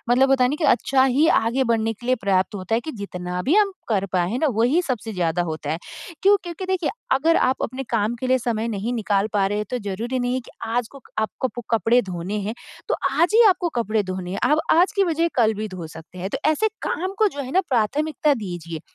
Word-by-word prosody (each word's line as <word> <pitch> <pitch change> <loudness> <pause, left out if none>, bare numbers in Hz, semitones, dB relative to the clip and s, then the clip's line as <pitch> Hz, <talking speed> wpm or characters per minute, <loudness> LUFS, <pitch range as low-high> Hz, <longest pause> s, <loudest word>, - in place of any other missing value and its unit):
मतलब 265 +2 +4
होता 265 -2 +4
है - - +3
ना 295 - -1
कि 325 - -1
अच्छा 265 -1 +3
ही 270 +4 +3
आगे 235 +2 +2
बढ़ने 225 -2 +1
के 240 - -12
लिए 255 - +4
पर्याप्त 190 0 +1
होता 195 +2 -2
है, 230 - +2
कि 315 +4 -6
जितना 180 -4 -5
भी 285 - +2
हम 415 -2 +4 0.2
कर 200 -4 +1
पाए 180 -1 +1
है 240 - -1
ना, 310 - +2
वही 245 +9 +2
सबसे 240 -7 -3
ज़्यादा 175 -1 0
होता 155 -3 -4
है। 160 - -2 0.4
क्यों? 400 +2 +6
क्योंकि 350 +2 -6
देखिए 370 -4 0 0.3
अगर 325 +5 +3
आप 260 - -1
अपने 255 +3 -4
काम 225 0 +1
के 255 - -2
लिए 260 0 +4
समय 230 -2 -2
नहीं 220 +2 -2
निकाल 205 -2 0
पा 200 -2 +3
रहे 205 +1 -1
हैं, 210 - -3
तो 250 - -1
ज़रूरी 235 +7 -2
नहीं 245 0 0
है 260 - -1
कि - - -14
आज 230 0 -1
को 275 -2 -13 0.2
आपको 220 +4 -1
कप 240 -1 -8
कपड़े 225 +4 +3
धोने 185 +1 -4
हैं, 220 - -3 0.3
तो - - +2 0.2
आज 340 +8 +2
ही 465 - +8
आपको 360 -1 0
कपड़े 215 -1 0
धोने 185 -1 -5
हैं। 195 - -3
आप 300 - +4
आज 350 +4 +4
की 395 - +4
बजाए 335 -1 +1
कल 220 -3 +3
भी 215 +1 -4
धो 185 -4 -7
सकते 160 +3 -12
हैं। 190 +2 -4
तो - - -2
ऐसे 435 +8 +2 0.2
काम 375 +3 -2
को 435 -1 +4
जो 285 -6 -6
है 260 - -7
ना 375 - +4
प्राथमिकता 285 +5 +1
दीजिए। 170 -3 -6
235 Hz, 250 wpm, -23 LUFS, 200-285 Hz, 0.4 s, ही